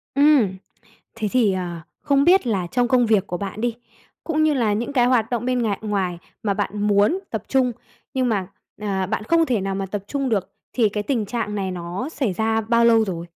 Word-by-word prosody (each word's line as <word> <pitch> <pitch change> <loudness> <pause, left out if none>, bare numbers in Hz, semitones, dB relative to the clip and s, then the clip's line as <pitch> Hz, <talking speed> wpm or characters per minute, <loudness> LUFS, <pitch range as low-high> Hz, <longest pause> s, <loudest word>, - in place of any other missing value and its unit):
Ừm. 275 -10 +4 0.6
Thế 220 -2 -2
thì, 225 -6 +3
ờ, 175 -2 -4 0.2
không 280 -1 +3
biết 355 -3 +4
là 195 -6 0
trong 245 +6 +1
công 250 -1 +3
việc 210 -3 +2
của 175 - -3
bạn 200 +2 -5
đi, 240 -1 0 0.5
cũng 310 -1 0
như 310 -1 +3
là 230 -6 +1
những 235 +6 -3
cái 245 -3 +4
hoạt 245 -3 +2
động 240 -1 -2
bên 250 -1 +1
ngà 210 -4 0
ngoài 195 -5 -1 0.3
mà 200 -2 +1
bạn 205 +1 -3
muốn 205 - +3
tập 220 -4 -3
trung, 260 -2 +2 0.4
nhưng 260 -2 +1
mà, 195 -5 -1 0.3
ờ, 195 -2 -1
bạn 215 +1 -2
không 330 +7 +3
thể 245 -8 0
nào 195 0 -2
mà 195 0 -2
tập 195 +1 -5
trung 275 0 -2
được, 195 -4 -1 0.2
thì 230 -4 +3
cái 210 0 -3
tình 230 -2 -1
trạng 215 -1 -3
này 190 -2 -2
nó 180 - -5
xảy 260 - -1
ra 220 +3 0
bao 235 +1 +3
lâu 225 -1 +5
rồi? 170 -4 -4
220 Hz, 225 wpm, -22 LUFS, 195-250 Hz, 0.6 s, lâu